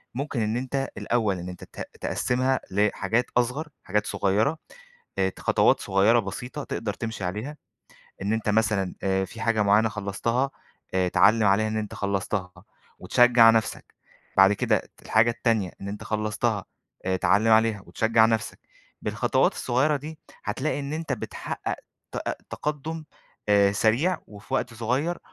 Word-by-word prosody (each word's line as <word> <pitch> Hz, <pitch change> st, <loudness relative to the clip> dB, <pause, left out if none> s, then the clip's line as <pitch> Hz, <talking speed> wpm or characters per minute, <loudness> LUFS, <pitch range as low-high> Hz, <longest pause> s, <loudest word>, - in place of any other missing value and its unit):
ممكن 140 Hz, -3 st, -2 dB
إن 110 Hz, +2 st, 0 dB
أنت 135 Hz, +1 st, -2 dB
الأول 110 Hz, -6 st, 0 dB
إن 90 Hz, +1 st, -6 dB
أنت 90 Hz, -, -9 dB
ت -, -, -13 dB, 0.2 s
تقسِّمها 130 Hz, +1 st, 0 dB
لحاجات 105 Hz, +3 st, +1 dB
أصغر، 125 Hz, +6 st, 0 dB, 0.2 s
حاجات 105 Hz, +2 st, 0 dB
صغيرة، 105 Hz, +11 st, +1 dB, 0.6 s
آآ، 95 Hz, 0 st, +3 dB
ت -, -, -10 dB
خطوات -, -, +3 dB
صغيرة 100 Hz, +5 st, +3 dB
بسيطة، 125 Hz, +8 st, -6 dB
تقدر 105 Hz, -3 st, -3 dB
تمشي 110 Hz, -4 st, -5 dB
عليها. 110 Hz, +12 st, -4 dB, 0.7 s
إن 100 Hz, +2 st, 0 dB
أنت 110 Hz, -1 st, -1 dB
مثلًا 105 Hz, -3 st, +1 dB
آآ 95 Hz, 0 st, +1 dB
في 110 Hz, +5 st, -10 dB
حاجة 110 Hz, -1 st, +2 dB
معينة 105 Hz, +2 st, +4 dB
خلصتها، 110 Hz, +6 st, -1 dB, 0.4 s
آآ 90 Hz, -1 st, +2 dB
تعلِّم 110 Hz, +3 st, +4 dB
عليها 110 Hz, +2 st, +3 dB
إن 110 Hz, -, -2 dB
أنت 105 Hz, -1 st, -3 dB
خلصتها 100 Hz, -2 st, -2 dB, 0.5 s
وتشجع 120 Hz, -2 st, +6 dB
نفْسَك، 115 Hz, 0 st, -1 dB, 0.4 s
بعد 95 Hz, +1 st, +7 dB
كده 100 Hz, -, +1 dB, 0.2 s
الحاجة 110 Hz, +2 st, +3 dB
التانية 115 Hz, -6 st, 0 dB
إن 100 Hz, -, -6 dB
أنت 105 Hz, +1 st, -6 dB
خلصتها، 110 Hz, 0 st, -1 dB, 0.4 s
آآ، 95 Hz, 0 st, +1 dB
تعلِّم 105 Hz, +4 st, +3 dB
عليها 110 Hz, -2 st, +3 dB
وتشجع 110 Hz, 0 st, +3 dB
نفْسَك. 110 Hz, -2 st, -1 dB, 0.4 s
بالخطوات -, -, +1 dB
الصغيرة 145 Hz, +5 st, +1 dB
دي، 155 Hz, +3 st, -8 dB, 0.3 s
هتلاقي 135 Hz, +8 st, -1 dB
إن 140 Hz, +1 st, -5 dB
أنت 160 Hz, -3 st, -3 dB
بتحقق -, -, -4 dB, 0.4 s
تأ -, -, -3 dB
أ -, -, 0 dB, 0.2 s
تقدم 155 Hz, +2 st, -4 dB, 0.4 s
آآ، 100 Hz, -1 st, +5 dB
سريع 125 Hz, -, +2 dB
وفي 105 Hz, 0 st, -8 dB
وقت 115 Hz, -, -1 dB
صغير 130 Hz, +10 st, -1 dB
110 Hz, 150 wpm, -26 LUFS, 100-125 Hz, 0.7 s, بعد